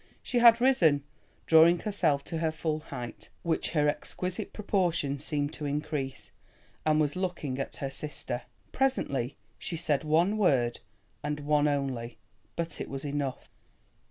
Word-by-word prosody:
She 245 - +1
had 235 -1 +8
risen, 170 - +4 0.4
drawing 165 +2 +7
herself 165 -10 +1
to 165 +1 -4
her 160 -1 +1
full 155 -1 -2
height, 125 -6 -8
which 165 -2 0
her 150 0 +4
exquisite 180 +4 -2
proportions 170 -9 0
seemed 145 -1 -1
to 150 - -6
increase, 145 -2 -3 0.6
and 155 0 +4
was 150 0 +1
looking 175 -8 -2
at 135 - -3
her 135 -1 -4
sister. 135 -4 -3 0.3
Presently 145 - 0 0.2
she 170 - -3
said 155 -3 +1
one 170 +7 +2
word 125 - +2 0.4
and 150 0 -2
one 150 0 +3
only, 135 -5 -2 0.4
but 170 -2 -2
it - - -5
was 135 +1 -5
enough. 140 -2 -3
150 Hz, 145 wpm, -29 LUFS, 140-170 Hz, 0.6 s, had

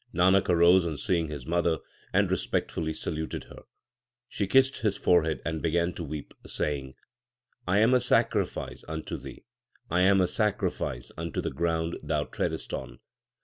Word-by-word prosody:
Nanak 95 +2 +4
arose 85 +1 +6
on 80 -3 -3
seeing 85 -3 0
his 75 -4 -7
mother, 85 -1 +1 0.3
and - - +2
respect - - -1
fully 80 -1 -2
saluted 80 0 -4
her. - - -13 0.7
She 100 - -2
kissed 130 +5 +4
his 105 -3 0
forehead 80 -3 +2
and 80 -1 -2
began 85 +1 +1
to 85 - -6
weep, 75 -1 -6
saying, 70 -3 -3 0.7
I 95 +2 +3
am 115 +3 +5
a 125 - +6
sacrifice - - 0
unto 80 0 -4
thee. - - -9 0.5
I 85 - +2
am 95 +1 +5
a 90 - +3
sacrifice 90 - -1
unto 85 -2 -3
the - - -2
ground 85 0 -1
thou - - 0
treadest - - -3
on. - - -5
85 Hz, 160 wpm, -28 LUFS, 80-95 Hz, 0.7 s, arose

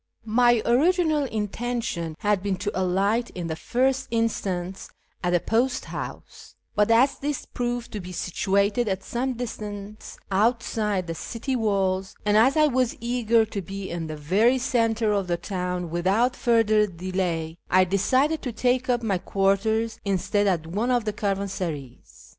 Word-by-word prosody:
My 240 0 +4
original 310 +3 +3
intention 220 -6 -3
had 205 -2 +2
been 200 -1 -1
to 205 +3 -3
alight 195 +6 +1
in 175 -2 -4
the 160 -1 -3
first 260 +8 0
instance 195 -5 -2 0.3
at 180 - +1
the 175 0 +3
post 240 +7 0
house, - - -8 0.2
but 210 -1 +2
as 250 +5 +4
this 290 0 -3
proved 240 -1 -3
to 210 - -4
be 180 -1 -8
situated 200 +5 0
at 190 -1 -2
some 255 +2 -2
distance 210 -3 -7
outside 210 -2 +1
the 165 - -4
city 235 - -4
walls, 195 -4 0
and 210 0 +3
as 255 +8 +5
I 305 - +6
was 255 -4 +1
eager 235 -1 +2
to 205 -2 -5
be 195 +1 -6
in 170 -1 -4
the 155 -1 -6
very 205 - +3
centre 230 -3 +1
of 200 -2 0
the 175 -1 0
town 180 -1 -3
without 195 +9 +2
further 220 -4 +3
delay, 175 -3 -3
I 185 +1 +5
decided 255 - +1
to 250 - -3
take 250 +2 0
up 240 -1 +1
my 195 -5 0
quarters 215 +4 0
instead 200 +1 +1
at 170 -5 +1
one 205 +9 -1
of 245 -3 +2
the 215 - -1
caravan 200 -1 -1
sarays. 150 -10 -7
210 Hz, 160 wpm, -25 LUFS, 185-240 Hz, 0.3 s, I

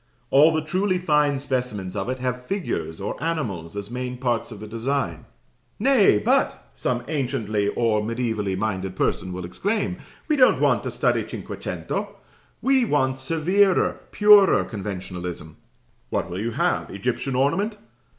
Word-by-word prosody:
All 150 +4 +7
the 160 -1 0
truly 185 +4 0
fine 150 -5 +2
specimens 125 -9 -2
of 100 +4 -2
it 130 - -2
have 125 0 -3
figures 80 - -3
or 100 +8 -4
animals 105 - -3
as 100 +2 -5
main 125 0 -4
parts 120 -2 -1
of 105 - -8
the 110 - -7
design. 115 - -2 0.5
"Nay, 235 - +5
but," 105 - 0
some 120 - -2
anciently 120 -8 -1
or 115 -3 +2
mediævally 110 -4 -2
minded 95 -3 -2
person 95 -1 -1
will 90 -1 -5
exclaim, 195 - -1 0.3
"we 305 - +2
don't 255 -3 +5
want - - +3
to - - -1
study - - +1
cinquecento. - - -5 0.5
We 265 -1 +4
want 130 - +1
severer, 175 +7 +2
purer 210 -2 +6
conventionalism." 90 -6 -6 0.5
What - - -2
will 90 - -4
you 115 +3 -1
have? 115 - 0
Egyptian 135 - -2
ornament? 195 - +1
125 Hz, 145 wpm, -24 LUFS, 100-160 Hz, 0.5 s, All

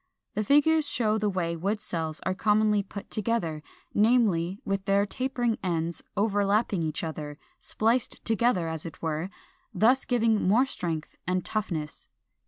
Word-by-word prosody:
The 215 - -1
figures 295 +5 +4
show 220 -2 +1
the 210 -1 +1
way 175 -3 -1
wood 200 +6 -1
cells 160 -5 -4
are 185 - -1
commonly 210 +1 +3
put 200 0 -9
together, 200 -8 -1 0.3
namely, 205 -5 +3
with 195 0 -2
their 200 0 +3
tapering 245 0 -1
ends 170 -2 -2 0.2
overlapping 205 -1 +1
each 155 0 -2
other, 150 -2 -5 0.2
spliced 230 +3 0
together, 225 -6 +2
as 160 -1 -3
it 165 - -9
were, 160 +3 -2 0.5
thus 250 +5 +4
giving 230 -3 +2
more 230 +7 +5
strength 165 - -4
and 185 0 0
toughness. 165 -8 -3
200 Hz, 145 wpm, -27 LUFS, 170-225 Hz, 0.5 s, more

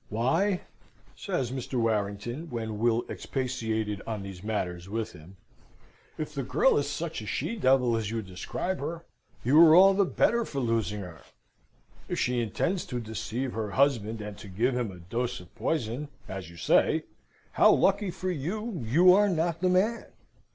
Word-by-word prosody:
"Why," 165 - +1 0.5
says 125 -3 -2
Mr. 130 0 -5
Warrington 115 +7 -1
(when 110 -4 -4
Will 115 +1 +2
expatiated 110 -6 -3
on 110 -3 -3
these 95 -1 -9
matters 90 -4 -3
with 110 +1 -3
him), 85 +5 -14 0.8
"if 155 -1 -4
the 140 - -2
girl - - +3
is - - -2
such - - -4
a - - -8
she 230 - -2
devil 130 - +3
as 110 -3 -2
you 115 0 -3
describe 95 - -4
her, 165 +4 -5 0.4
you 145 +7 +6
are 160 -1 +8
all 195 +2 +8
the 200 +1 +3
better 235 +5 +2
for 145 - -7
losing 115 -5 0
her. 90 -4 -10 0.9
If - - -2
she 125 -1 +1
intends 170 - -1
to 125 - -3
deceive 115 +3 -4
her 110 -1 -3
husband, 115 -4 +1
and 105 -1 -6
to 105 - -10
give 115 +7 0
him 120 -3 -1
a 90 - -11
dose 115 +8 -3
of 90 -2 -15
poison, 135 -1 -2 0.2
as 95 -3 -6
you 85 - -14
say, - - +3 0.5
how - - +6
lucky 200 0 +3
for 185 +1 -3
you, 180 - -3
you 170 +11 +6
are 205 +2 +4
not 170 -1 0
the 185 - +3
man! 205 +6 +2
120 Hz, 170 wpm, -28 LUFS, 105-165 Hz, 0.9 s, are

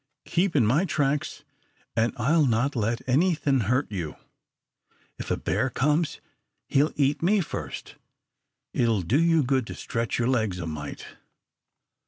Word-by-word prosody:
Keep 175 0 0
in 130 -6 +4
my 135 - +3
tracks 145 -5 -1 0.5
an' 115 +1 +2
I'll 145 +6 +3
not 125 +5 +1
let 115 +2 -1
anythin' 145 -1 +2
hurt 130 -1 +1
you. 85 -7 -4 1.0
If - - -6
a - - +1
bear 130 - 0
comes, 150 +6 0 0.5
he'll 145 +3 +2
eat 145 0 +1
me 200 +5 +3
first. 175 - -6 0.8
It'll 115 -6 +1
do 130 - +2
you 165 -2 +4
good 130 -2 0
to - - -6
stretch 115 -2 -2
your 120 - +1
legs 110 -8 +1
a 90 - -4
mite." 75 -3 -6
130 Hz, 145 wpm, -26 LUFS, 115-150 Hz, 1.0 s, in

